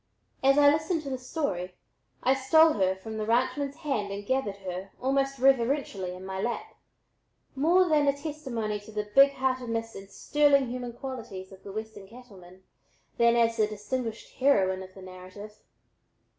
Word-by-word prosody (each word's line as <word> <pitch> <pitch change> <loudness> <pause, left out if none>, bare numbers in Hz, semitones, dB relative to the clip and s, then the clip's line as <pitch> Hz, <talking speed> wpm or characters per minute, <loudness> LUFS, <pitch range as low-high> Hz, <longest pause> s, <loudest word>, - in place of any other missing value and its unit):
As 275 +1 +5
I 285 0 +7
listened 315 +1 -1
to 275 - -5
the 260 - -3
story, 195 - -3 0.5
I 260 - +4
stole 315 +4 +5
her 190 -2 +1
from 220 +3 -8
the 215 - -2
ranchman's 270 +4 0
hand 220 -11 -3
and 200 +1 -6
gathered 260 -5 -1
her, 185 +1 -5
almost 275 +1 0
reverently, 245 -7 +1
in 185 +1 -10
my 190 0 -4
lap, 240 - -3 0.8
more 345 +7 +4
then 300 -3 +3
as 280 0 +1
a - - -16
testimony 245 -9 -3
to 205 +2 -14
the 210 -1 -4
big 275 +2 +7
heartedness 245 -4 -2
and 195 0 -10
sterling 280 +2 +2
human 245 -1 -5
qualities 230 -7 -7
of 190 - -14
the 200 - -9
Western 215 -1 -7
cattlemen, 190 -6 -15 0.6
than 235 0 +5
as 230 -1 +2
the 215 -1 +3
distinguished 220 +2 -5
heroine 195 -9 +2
of 190 0 -10
the 190 - -11
narrative. 185 +3 -11
235 Hz, 170 wpm, -28 LUFS, 200-275 Hz, 0.8 s, I